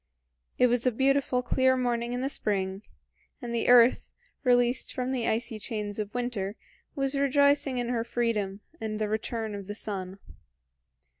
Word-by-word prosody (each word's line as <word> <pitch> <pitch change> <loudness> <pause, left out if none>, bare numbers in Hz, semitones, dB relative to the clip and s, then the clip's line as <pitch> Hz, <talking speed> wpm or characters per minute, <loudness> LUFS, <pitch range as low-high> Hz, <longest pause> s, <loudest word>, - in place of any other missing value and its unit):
It 250 - +5
was 245 0 +2
a - - +4
beautiful 265 0 +1
clear 260 +1 +2
morning 240 -1 -1
in 245 0 -2
the 265 - 0
spring, 195 -6 -1 0.6
and 240 -4 -6
the 235 - 0
earth, 245 0 +5 0.3
released 245 -1 +2
from 255 0 -2
the 245 -3 -1
icy 225 0 -1
chains 210 -1 -4
of 210 -1 -3
winter, 230 -5 -3 0.4
was 275 -1 0
rejoicing 280 0 +3
in 240 -1 -2
her 235 -2 0
freedom 215 -5 -2 0.2
and 215 -1 -3
the 215 0 -1
return 220 +1 -3
of 200 -2 -7
the 205 - -5
sun. 190 -3 -4
240 Hz, 160 wpm, -28 LUFS, 215-255 Hz, 0.6 s, It